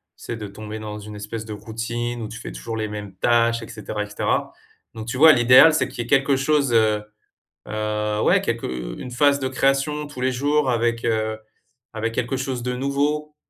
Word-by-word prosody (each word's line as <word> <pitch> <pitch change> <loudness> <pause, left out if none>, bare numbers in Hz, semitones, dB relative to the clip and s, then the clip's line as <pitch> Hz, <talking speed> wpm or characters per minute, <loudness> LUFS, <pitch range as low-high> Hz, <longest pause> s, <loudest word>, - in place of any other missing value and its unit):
sais, 120 - -6
de 105 - -6
tomber 105 +2 -8
dans 105 0 -6
une 105 0 -9
espèce 105 +2 -6
de 110 - -6
routine 115 +3 -4
où 110 - -4
tu 120 - -8
fais - - -7
toujours 115 -1 -6
les 110 -1 -2
mêmes 105 -2 -7
tâches 115 +2 +2
et - - -8
cetera 105 -1 -5
et - - -6
cetera. 105 - -1 0.4
Donc, 110 0 -8
tu 125 +2 -3
vois 160 +2 +9
l'idéal 130 +6 +7
c'est 130 -4 +1
qu'il 120 - -5
y - - -11
ait - - -13
quelque 135 0 +3
chose, 140 -1 +2
heu, 110 -2 +3 0.6
heu, 105 0 -2
ouais, - - +4
quelque - - -2 0.3
une 125 - -7
phase 140 +3 +3
de 130 - -1
création 135 +3 0
tous 145 -3 -9
les 130 0 +2
jours 145 +2 +1
avec, 115 0 0
heu, 110 -1 0 0.6
avec 115 +1 -2
quelque 125 +2 -1
chose 130 -2 -3
de 125 0 -2
nouveau 145 +3 -1
120 Hz, 210 wpm, -22 LUFS, 110-135 Hz, 0.6 s, vois